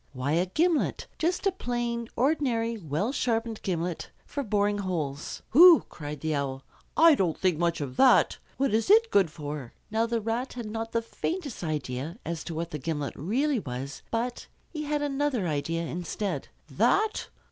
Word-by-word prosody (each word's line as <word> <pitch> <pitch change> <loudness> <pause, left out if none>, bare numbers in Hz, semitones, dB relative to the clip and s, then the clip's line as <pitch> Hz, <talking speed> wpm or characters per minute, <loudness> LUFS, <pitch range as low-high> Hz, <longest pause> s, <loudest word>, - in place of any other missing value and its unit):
Why, 130 +2 -2
a 170 +4 +2
gimlet! 325 - +1
Just 350 +5 0
a 390 - +4
plain, 240 -7 -3
ordinary, 245 -4 +1
well 185 - -2
sharpened 230 -4 -1
gimlet 175 -2 -2 0.2
for 285 - -4
boring 205 -3 +1
holes. 160 -7 -3
"Hoo!" 340 +5 +9
cried 150 -2 -7
the 160 0 -1
Owl. 135 -2 -2 0.3
"I 330 0 +8
don't 185 - +1
think 180 -4 +1
much 170 -2 +1
of 130 -3 -5
that. 265 - +5 0.2
What 270 -4 +1
is 225 +10 +1
it 450 +2 +6
good 195 -5 +4
for?" 150 -5 -6 0.2
Now 225 +1 +1
the 230 0 0
Rat 230 +4 -2
had 240 -2 -6
not 225 +1 -4
the 230 0 0
faintest 290 - -4
idea 150 - -3
as 165 -2 -3
to 165 - -5
what 165 +1 -3
the 150 - -4
gimlet 145 0 -3
really 260 - 0
was, 135 -3 -6
but 235 +2 -2 0.2
he 305 -2 -4
had 295 0 0
another 275 -8 0
idea 165 +2 -1
instead. 180 +5 -3 0.2
"That? 435 0 +1
210 Hz, 170 wpm, -28 LUFS, 160-255 Hz, 0.3 s, Hoo